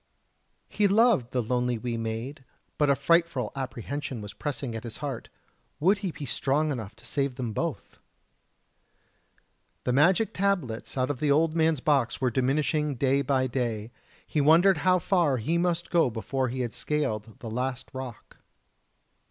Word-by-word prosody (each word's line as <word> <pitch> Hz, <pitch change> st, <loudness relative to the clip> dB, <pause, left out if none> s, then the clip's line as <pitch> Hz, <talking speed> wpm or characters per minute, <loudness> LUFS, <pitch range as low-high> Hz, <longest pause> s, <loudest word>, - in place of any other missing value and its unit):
He 205 Hz, -, +2 dB
loved 205 Hz, -, +4 dB
the 125 Hz, -1 st, -1 dB
lonely 125 Hz, +1 st, 0 dB
wee 120 Hz, +1 st, -3 dB
maid, 115 Hz, +5 st, -4 dB, 0.4 s
but 150 Hz, -1 st, +3 dB
a 140 Hz, -, +5 dB
frightful 165 Hz, -1 st, +2 dB
apprehension 130 Hz, +1 st, -4 dB
was 105 Hz, -1 st, -8 dB
pressing 135 Hz, -4 st, -4 dB
at 115 Hz, -, -5 dB
his 115 Hz, -2 st, -6 dB
heart 140 Hz, -5 st, -5 dB, 0.5 s
would 190 Hz, +6 st, +3 dB
he 195 Hz, -2 st, -2 dB
be 150 Hz, -3 st, -7 dB
strong 145 Hz, +3 st, 0 dB
enough 110 Hz, -6 st, -5 dB
to 115 Hz, +1 st, -17 dB
save 140 Hz, +1 st, -1 dB
them 120 Hz, -4 st, -3 dB
both? -, -, -4 dB, 1.8 s
The 125 Hz, -, 0 dB
magic 180 Hz, -, +3 dB
tablets 180 Hz, -, -1 dB
out 130 Hz, +2 st, +1 dB
of 135 Hz, -, -5 dB
the 150 Hz, -, +1 dB
old 155 Hz, +3 st, +3 dB
man's 160 Hz, -4 st, +2 dB
box 135 Hz, -6 st, +1 dB
were 130 Hz, -2 st, +1 dB
diminishing 145 Hz, +3 st, +1 dB
day 135 Hz, +2 st, +2 dB
by 135 Hz, -1 st, +1 dB
day. 120 Hz, -3 st, -2 dB, 0.3 s
He 150 Hz, -, 0 dB
wondered 170 Hz, +6 st, +6 dB
how 185 Hz, +4 st, +4 dB
far 170 Hz, -6 st, +2 dB
he 120 Hz, +8 st, -2 dB
still 170 Hz, -, +2 dB
must 175 Hz, -1 st, -1 dB
go 165 Hz, -6 st, +4 dB
before 130 Hz, +3 st, -2 dB
he 130 Hz, +2 st, -3 dB
had 120 Hz, -2 st, -3 dB
scaled 110 Hz, -8 st, -2 dB
the 115 Hz, -, -7 dB
last 125 Hz, +2 st, -3 dB
rock. 130 Hz, -4 st, -8 dB
135 Hz, 165 wpm, -27 LUFS, 120-155 Hz, 1.8 s, wondered